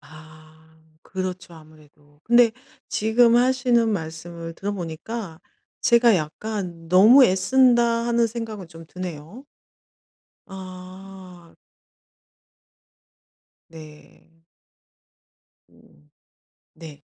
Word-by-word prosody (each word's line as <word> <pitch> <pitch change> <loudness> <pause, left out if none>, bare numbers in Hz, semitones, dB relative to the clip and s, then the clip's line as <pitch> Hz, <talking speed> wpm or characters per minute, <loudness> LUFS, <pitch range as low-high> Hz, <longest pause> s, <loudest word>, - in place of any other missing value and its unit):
아. 155 0 -16 0.6
그렇죠 185 -1 -6
아무래도. 150 -2 -20
근데 235 -1 +4 0.4
지금 230 +2 +3
하시는 245 -2 +2
말씀을 165 -2 -6
들어 200 +4 -4
보니까 175 +1 -7 0.4
제가 235 -1 +4
약간 170 +1 -6
'너무 215 +10 +7
애쓴다.' 235 +3 +2
하는 235 0 +2
생각은 220 -5 -7
좀 165 -1 -14
드네요. 180 - -9 1.0
아. 185 -1 -12 2.1
네. 155 -1 -16 1.4
음. 75 +1 -25 0.6
네. 150 -3 -13
185 Hz, 155 characters per minute, -22 LUFS, 160-230 Hz, 2.1 s, 너무